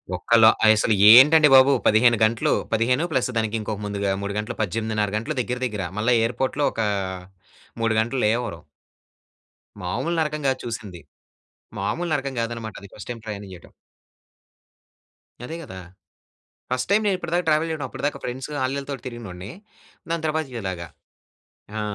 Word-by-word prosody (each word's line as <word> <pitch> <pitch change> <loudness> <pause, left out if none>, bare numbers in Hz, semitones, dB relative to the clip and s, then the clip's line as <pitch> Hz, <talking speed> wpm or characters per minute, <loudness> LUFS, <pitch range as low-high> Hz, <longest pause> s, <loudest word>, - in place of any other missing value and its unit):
ఒక్కళ్లు 110 +5 +5 0.2
అయసలు 110 +1 +4 0.2
ఏంటండి 150 +5 +8
బాబు. 135 +1 +7
15 120 +2 +5
గంటలు. 115 +1 +1 0.2
15+ 125 +5 +1
దానికి 110 0 -1
ఇంకొక 105 -1 -4
ముందుగా 100 -1 -2
3 100 0 -4
గంటలు, 105 +3 -4
18:30 110 +1 -1
గంటలు 145 +8 -4
దగ్గర 125 +1 -4
దగ్గర. 105 -5 -3
మళ్ళా 110 +4 +1
ఎయిర్‌పోర్ట్‌లో 130 +5 -1
ఒక 115 - -2 1.0
3 115 0 +1
గంటలు 120 +3 -1
లేఓవరు. 110 -6 -1 1.2
మామూలు 155 - -2
నరకం 150 -1 -1
గాదు 130 - 0
చూసింది. 110 -7 -6 0.8
మామూలు 130 - -2
నరకం 140 -2 -2
గాదన్నమాటది 115 -3 -5
ఫస్ట్‌టైమ్ 115 +2 -8
ప్రయాణం 100 -2 -7
చేయడం. 90 - -14 1.7
అదే 160 - -6
కదా! 95 -10 -9 0.9
ఫస్ట్‌టైమ్ 150 +13 +1
నేనిప్పటిదాకా 180 -3 -1
ట్రావెల్ 155 +1 +2
చేయడం. 155 -4 -3
అప్పటిదాకా 145 +3 -3
ఫ్రెండ్స్ 125 +2 -5 0.2
ఆల్లీలతోటి 135 -1 -4
తిరిగినోన్ని, 105 -6 -8 0.6
దాని 165 -1 -2
తర్వాత 155 0 -1
ఇలాగ. 95 -4 -4 1.0
ఆ! - - -2
120 Hz, 125 wpm, -23 LUFS, 105-140 Hz, 1.7 s, ఏంటండి